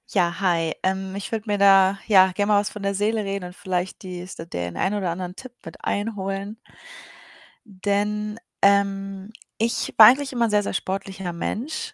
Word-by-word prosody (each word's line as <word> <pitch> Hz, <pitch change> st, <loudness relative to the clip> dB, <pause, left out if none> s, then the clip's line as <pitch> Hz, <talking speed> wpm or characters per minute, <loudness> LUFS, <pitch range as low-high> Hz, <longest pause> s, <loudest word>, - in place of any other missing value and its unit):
Ja, 175 Hz, -3 st, +3 dB
hi. 170 Hz, -4 st, +1 dB
Ähm, 190 Hz, 0 st, -1 dB
ich 200 Hz, -, -6 dB
würde 220 Hz, -2 st, -2 dB
mir 205 Hz, -, +1 dB
da, 195 Hz, -1 st, +5 dB
ja, 190 Hz, -3 st, +6 dB
gerne 205 Hz, +3 st, +1 dB
mal 205 Hz, -, +5 dB
was 205 Hz, -, -3 dB
von 210 Hz, -, -9 dB
der 200 Hz, 0 st, -1 dB
Seele 210 Hz, +1 st, 0 dB
reden 195 Hz, -1 st, -3 dB
und 180 Hz, -, -11 dB
vielleicht 185 Hz, -1 st, -3 dB
die 180 Hz, -1 st, -6 dB
s 185 Hz, +1 st, -9 dB
den 85 Hz, -, -5 dB
ein 190 Hz, -, 0 dB
oder 200 Hz, -4 st, -1 dB
anderen 180 Hz, +1 st, -5 dB
Tipp 255 Hz, +2 st, -10 dB
mit -, -, -11 dB
einholen 200 Hz, 0 st, -3 dB, 1.3 s
denn, 210 Hz, +1 st, -1 dB, 0.2 s
ähm, 195 Hz, 0 st, +1 dB, 0.3 s
ich 230 Hz, +2 st, -1 dB
war 215 Hz, -, +11 dB
eigentlich 270 Hz, +3 st, +3 dB
immer 240 Hz, -2 st, +2 dB
ein -, -, 0 dB
sehr, 210 Hz, 0 st, +3 dB
sehr -, -, -4 dB
sportlicher 190 Hz, -2 st, -4 dB
Mensch. 315 Hz, -, -4 dB
195 Hz, 185 wpm, -23 LUFS, 190-210 Hz, 1.3 s, war